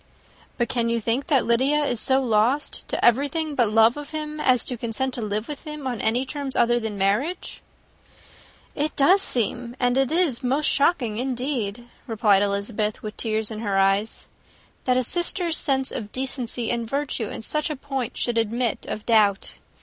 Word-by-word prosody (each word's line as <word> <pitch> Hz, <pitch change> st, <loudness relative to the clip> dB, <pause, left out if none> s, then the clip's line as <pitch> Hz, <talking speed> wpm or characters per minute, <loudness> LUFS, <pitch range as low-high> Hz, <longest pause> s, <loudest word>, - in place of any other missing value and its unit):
"But 240 Hz, -, 0 dB
can 235 Hz, -1 st, 0 dB
you 235 Hz, 0 st, 0 dB
think 235 Hz, +6 st, -1 dB
that 280 Hz, -6 st, +2 dB
Lydia 265 Hz, +6 st, +2 dB
is 245 Hz, -5 st, 0 dB
so 265 Hz, +3 st, +4 dB
lost 240 Hz, +5 st, 0 dB
to -, -, -1 dB
everything 290 Hz, +6 st, +2 dB
but 240 Hz, -6 st, +2 dB
love 225 Hz, +4 st, +4 dB
of 295 Hz, -1 st, -7 dB
him, 305 Hz, -1 st, -5 dB
as 255 Hz, -5 st, +2 dB
to 250 Hz, -, -4 dB
consent 235 Hz, +3 st, -3 dB
to 245 Hz, -, -5 dB
live 215 Hz, +1 st, -3 dB
with 295 Hz, -2 st, -7 dB
him 300 Hz, -3 st, -8 dB
on 245 Hz, -4 st, -3 dB
any 230 Hz, +3 st, +1 dB
other 265 Hz, -, -6 dB
terms 280 Hz, -3 st, -3 dB
than 235 Hz, -3 st, +1 dB
marriage?" 215 Hz, -, -1 dB, 1.1 s
"It 300 Hz, +2 st, -2 dB
does 370 Hz, +8 st, +5 dB
seem, 245 Hz, -, +4 dB
and 245 Hz, 0 st, +1 dB
it 270 Hz, +1 st, +1 dB
is 320 Hz, -7 st, +1 dB
most 275 Hz, +4 st, 0 dB
shocking, 270 Hz, -9 st, +1 dB
indeed," 245 Hz, -3 st, -3 dB, 0.2 s
replied 210 Hz, -4 st, +3 dB
Elizabeth, 205 Hz, +1 st, -2 dB
with 215 Hz, -1 st, -6 dB
tears 220 Hz, -1 st, -2 dB
in 215 Hz, -, -6 dB
her 205 Hz, -3 st, -1 dB
eyes, 195 Hz, +3 st, +1 dB, 0.6 s
"that 255 Hz, -1 st, +2 dB
a 255 Hz, -, +2 dB
sister's 345 Hz, -, 0 dB
sense 265 Hz, -1 st, 0 dB
of 210 Hz, -4 st, -6 dB
decency 250 Hz, -3 st, -3 dB
and 235 Hz, -2 st, -3 dB
virtue 275 Hz, -5 st, -2 dB
in -, -, -7 dB
such 305 Hz, +6 st, -1 dB
a 305 Hz, -, -3 dB
point 270 Hz, -3 st, -5 dB
should 235 Hz, -1 st, 0 dB
admit 230 Hz, +1 st, -1 dB
of 210 Hz, -, -5 dB
doubt. 210 Hz, -4 st, +2 dB
245 Hz, 180 wpm, -23 LUFS, 220-280 Hz, 1.1 s, does